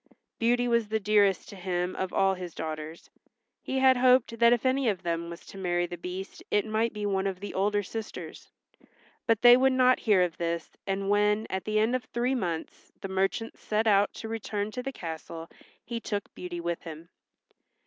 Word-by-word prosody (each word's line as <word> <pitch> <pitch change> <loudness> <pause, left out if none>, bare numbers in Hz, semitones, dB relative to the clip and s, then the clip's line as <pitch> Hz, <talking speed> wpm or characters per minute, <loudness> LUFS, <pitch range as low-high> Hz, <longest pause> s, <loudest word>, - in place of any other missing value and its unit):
Beauty 245 +1 +2
was 235 -2 +2
the 220 +1 0
dearest 205 -2 +3
to - - -9
him 180 -1 -2
of 190 -1 -3
all 195 0 +3
his 180 -3 -7
daughters. 155 +1 -6 0.5
He 265 - -3
had 260 -1 +5
hoped 250 -2 +4
that 235 0 +6
if 240 +1 +2
any 260 -1 +2
of 190 -3 -2
them 170 0 -2
was 170 0 -9
to 195 - -10
marry 175 -1 0
the 175 - -6
Beast 180 +3 -7
it 205 +1 +2
might 220 +1 0
be 210 -1 -4
one 195 -1 0
of 190 -2 -3
the 205 - -6
older 205 +2 +1
sisters. 220 +2 -7 0.8
But 230 0 +2
they 240 0 +10
would 265 +1 +4
not 255 0 +4
hear 205 -5 +4
of 175 -3 -2
this 170 -1 -3 0.2
and 195 +1 -1
when, 210 +1 +2
at 190 0 -3
the 215 0 0
end 220 +4 +3
of 250 -3 -3
three 245 +3 -1
months, 170 -10 -4
the 195 - -5
merchant 195 +4 -1
set 215 +1 0
out 205 -1 +4
to 225 - -6
return 215 -2 -3
to 250 - -4
the 270 +2 -4
castle 165 -4 -7 0.4
he 235 -1 -4
took 205 -3 -4
Beauty 175 -1 -6
with 170 0 -3
him. 165 0 -9
205 Hz, 200 wpm, -28 LUFS, 180-230 Hz, 0.8 s, they